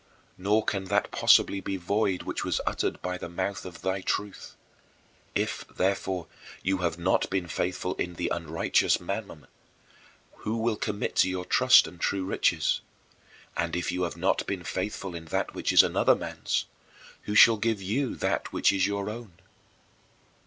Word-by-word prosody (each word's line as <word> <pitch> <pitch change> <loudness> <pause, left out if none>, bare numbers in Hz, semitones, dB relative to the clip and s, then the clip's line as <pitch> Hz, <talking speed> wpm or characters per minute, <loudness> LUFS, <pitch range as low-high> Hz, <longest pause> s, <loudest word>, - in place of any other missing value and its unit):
" - - -34
Nor 105 +3 +2
can 100 -2 -1
that 100 +2 0
possibly 100 - +4
be 95 - -3
void 95 +1 0
which - - -3
was - - 0
uttered - - -1
by 90 0 -3
the 85 - -6
mouth 95 +3 -3
of 90 -3 -10
Thy 95 +1 -1
truth: 100 +1 -3 0.8
"If, - - -1
therefore, 95 -2 -1 0.4
you 95 0 +1
have 85 -2 -1
not 85 +2 +1
been 95 -2 -1
faithful 90 +1 -2
in 90 0 -3
the 85 +1 -2
unrighteous 80 -1 +1
mammon, 95 -5 -5 0.9
who 110 +2 -3
will 115 0 0
commit 105 -1 -3
to - - +5
your 90 -1 -3
trust 130 +5 +6
the - - -8
true 95 +2 -2
riches? 95 - +1 0.7
And 85 -1 -1
if 90 - -1
you 90 - -2
have 85 -1 -2
not 95 +3 0
been 95 -3 -3
faithful 95 +1 -4
in 85 -1 -7
that 80 - -2
which - - -1
is - - +8
another - - +3
man's, - - -2 0.6
who 105 - -3
shall 115 +1 +8
give 110 0 0
you 115 +8 -1
that - - -1
which - - +3
is 95 -1 +2
your 100 0 -2
own?" 110 -3 -7
95 Hz, 170 wpm, -27 LUFS, 90-105 Hz, 0.9 s, is